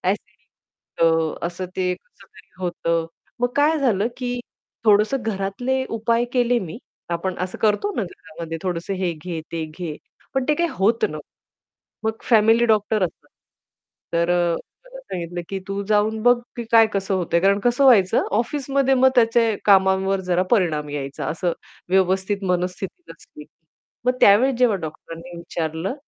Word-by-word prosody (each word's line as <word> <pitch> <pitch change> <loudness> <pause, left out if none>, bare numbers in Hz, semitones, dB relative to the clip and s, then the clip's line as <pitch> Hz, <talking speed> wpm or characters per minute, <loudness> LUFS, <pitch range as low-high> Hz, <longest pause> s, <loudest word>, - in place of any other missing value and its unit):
Acidity - - -3 0.6
अ, 165 0 +1
असं 175 +2 -5
ते 180 -1 0
कसं 195 +2 -21
तरी - - -19
होतं. 170 -2 -1 0.3
मग 245 - +2
काय 305 +2 +3
झालं, 225 -6 +2
की 245 -1 -3 0.4
थोडंसं 215 +5 +3
घरातले 225 +6 -1
उपाय 230 +1 +1
केले 245 -1 +2
मी, 185 +4 -7 0.3
आपण 175 +2 -2
असं 185 0 -4
करतो 220 - +2
ना - - 0
घरामध्ये 165 -2 -8
थोडंसं 180 +1 -2
हे 185 -2 -1
घे, 165 +1 -6
ते 165 -1 -2
घे 155 0 -6 0.4
पण 265 - +1
ते 300 - +4
काही 340 +3 0
होत 220 +5 +2
नव्हतं. - - -8 0.8
मग 220 - +2
फॅमिली 225 0 +4
डॉक्टर 215 -1 +2
असतात. 170 - -7 0.8
तर 170 +1 +1
अ, 175 -1 +2 0.3
मला - - -11
सांगितलं, 175 - -5
की 195 - -3
"तू 195 0 -2
जाऊन 215 +1 +1
बघ 245 +1 +6 0.2
की 235 - -4
काय 225 -1 +7
कसं 195 0 0
होतंय?" 170 -2 +1
कारण 195 +2 +3
कसं 245 +3 +3
व्हायचं 205 -8 +5 0.2
ऑफिसमध्ये 275 +1 0
मग 260 0 +5
त्याचे 230 -3 +3
कामांवर 190 -1 +4
जरा 180 +1 +3
परिणाम 160 -9 +1
यायचा 140 -1 -4
असं 170 +2 -1 0.4
व्यवस्थित 190 +2 +1
मनस्थिती 180 - -3
नसली, 150 - -14
की - - -28 0.6
मग 250 - +5
त्यावेळेस 245 +7 +6
जेव्हा 245 -5 +3
डॉक्टरांनी 165 +2 -8
विचारलं 170 +3 -3
195 Hz, 155 wpm, -22 LUFS, 175-235 Hz, 0.8 s, काय